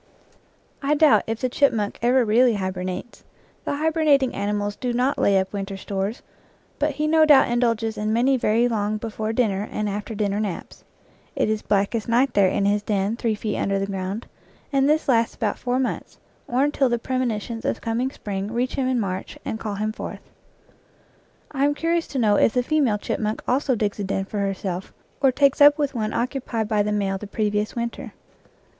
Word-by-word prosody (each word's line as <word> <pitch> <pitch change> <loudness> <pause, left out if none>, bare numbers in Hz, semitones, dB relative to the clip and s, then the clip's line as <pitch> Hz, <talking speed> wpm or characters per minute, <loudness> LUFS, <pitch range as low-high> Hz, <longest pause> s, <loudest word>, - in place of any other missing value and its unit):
I 290 +1 +2
doubt 300 -1 +5
if 225 0 -3
the 255 - +1
chipmunk 235 -5 +1
ever 245 +1 +3
really 235 +2 +4
hibernates; 185 +2 -4 0.4
the - - -1
hibernating 300 -3 +2
animals 205 0 -2
do 245 +2 -3
not 255 +3 +1
lay 200 -1 +4
up 190 +1 -1
winter 195 -1 -4
stores, 195 +4 -4 0.6
but 295 0 +1
he 300 +2 -2
no 315 +1 +4
doubt 290 -5 +6
indulges 230 -2 0
in 215 +1 -1
many 250 +4 +3
very 235 -1 +2
long 215 -2 -1
before 220 0 -4
din 225 -2 +2
ner 195 +2 -3
and 210 0 -2
after 205 +2 -4
dinner 205 -1 -1
naps. 200 -5 -5 0.5
It - - +1
is 215 -1 -1
blackest 205 +3 0
night 245 +2 +3
there 200 -2 +4
in 200 +1 0
his 205 +1 +2
den 205 +1 -1
three 230 -2 -1
feet 215 0 -3
under 195 0 0
the 195 - -1
ground, 195 +3 -4 0.5
and 275 +1 +3
this 310 +1 +2
lasts 230 -3 +2
about 210 -3 -2
four 245 0 -1
months, 260 -1 -3 0.3
or 250 +3 +1
until 285 -2 +2
the 240 - +1
premonitions 235 -2 -2
of - - -1
coming 235 +3 -1
spring 200 -5 -5
reach 245 +2 -1
him 265 -2 -1
in 255 -1 +1
March 190 -3 -4
and 220 - -3
call 210 -3 -4
him 215 +2 -1
forth. - - -8 1.2
I 275 -1 -1
am 290 +1 +2
curious 335 +2 0
to 275 - -5
know 210 -4 +3
if 230 - +3
the 250 - +2
female 270 -6 +2
chipmunk 215 +1 -3
also 260 +1 +1
digs 210 -1 -2
a - - -1
den 195 0 -2
for 205 +1 -5
herself, 195 -2 -3 0.3
or 270 -1 +5
takes 280 +2 +2
up 290 +1 +8
with 290 -2 -1
one 220 -3 -2
occupied 240 -3 -2
by 210 -1 +1
the 210 +1 0
male 195 -2 -1
the 210 - -7
previous 210 0 -1
winter. 235 -1 -4
225 Hz, 195 wpm, -23 LUFS, 205-255 Hz, 1.2 s, up